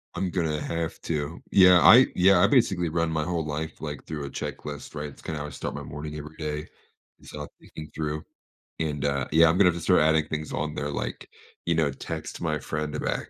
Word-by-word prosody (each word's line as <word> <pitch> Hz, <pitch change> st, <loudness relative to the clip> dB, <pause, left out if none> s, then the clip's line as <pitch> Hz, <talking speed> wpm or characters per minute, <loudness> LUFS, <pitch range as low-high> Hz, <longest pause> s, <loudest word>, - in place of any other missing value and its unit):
I'm 95 Hz, -, -1 dB
gonna 80 Hz, -4 st, -1 dB
have 85 Hz, -1 st, -3 dB
to. 75 Hz, +1 st, -3 dB
Yeah, 90 Hz, -2 st, +7 dB
I 125 Hz, +3 st, +9 dB
yeah, 95 Hz, 0 st, +5 dB
I 100 Hz, -, +6 dB
basically 95 Hz, -, +2 dB
run 85 Hz, 0 st, 0 dB
my 80 Hz, -1 st, -1 dB
whole 85 Hz, -2 st, -2 dB
life, 75 Hz, +1 st, -5 dB
like, 75 Hz, -3 st, -6 dB
through 75 Hz, -2 st, -5 dB
a -, -, -6 dB
checklist, 75 Hz, +1 st, -6 dB
right, 75 Hz, 0 st, -4 dB
it's 70 Hz, -, -15 dB
kinda 80 Hz, -2 st, -4 dB
how 75 Hz, -, -4 dB
I -, -, -7 dB
start 70 Hz, -, -5 dB
my -, -, -5 dB
morning 75 Hz, +1 st, -7 dB
every 75 Hz, +1 st, -9 dB
day, 75 Hz, -1 st, -4 dB, 0.5 s
it's -, -, -14 dB
all 75 Hz, -1 st, -6 dB
thinking 75 Hz, -1 st, -10 dB
through, 75 Hz, -1 st, -3 dB, 0.6 s
and, 75 Hz, -3 st, -2 dB
uh, 70 Hz, -1 st, 0 dB
yeah, 80 Hz, +2 st, +6 dB
I'm 85 Hz, -, +2 dB
gonna 95 Hz, -2 st, +6 dB
have 85 Hz, -, -1 dB
to 85 Hz, -, -5 dB
start 90 Hz, -1 st, +4 dB
adding 80 Hz, 0 st, +3 dB
things 75 Hz, -1 st, -4 dB
on 75 Hz, +2 st, -2 dB
there, 70 Hz, -, -3 dB
like, 60 Hz, -4 st, -5 dB, 0.4 s
you 85 Hz, -, +1 dB
know, 80 Hz, -3 st, +2 dB
text 65 Hz, -, -6 dB
my 80 Hz, -3 st, 0 dB
friend 75 Hz, +2 st, -3 dB
back. -, -, -2 dB
75 Hz, 225 wpm, -26 LUFS, 75-85 Hz, 0.6 s, I